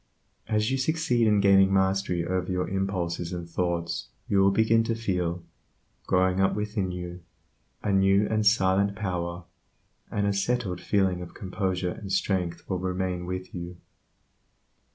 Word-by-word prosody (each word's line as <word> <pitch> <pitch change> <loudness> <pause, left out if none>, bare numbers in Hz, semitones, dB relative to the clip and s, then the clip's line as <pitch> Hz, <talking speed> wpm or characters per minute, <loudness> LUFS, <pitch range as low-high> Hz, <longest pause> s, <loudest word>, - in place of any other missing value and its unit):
As 110 +2 +1
you 135 - 0
succeed 130 -5 +1
in 105 -1 +4
gaining 95 -1 +5
mastery 95 -2 +1
over 90 +1 -1
your 90 0 -1
impulses 90 -3 -2
and 85 -1 -5
thoughts 85 -1 -2 0.2
you 100 - +2
will 95 0 +6
begin 110 +3 +3
to 115 - 0
feel, 90 -6 -2 0.6
growing 95 0 +2
up 95 - +3
within 105 -2 -2
you, 90 0 -6 0.6
a 105 - 0
new 95 +1 +4
and 110 -1 +1
silent 100 -1 +3
power, 90 -2 -3 0.7
and 100 -1 -1
a 100 - +1
settled 100 -3 -1
feeling 95 -3 +1
of 90 - -9
composure 95 -2 -2
and 100 0 -7
strength 90 -3 -1
will 95 -2 -1
remain 90 -1 -2
with 90 0 -5
you. 85 0 -6
95 Hz, 150 wpm, -27 LUFS, 90-100 Hz, 0.7 s, will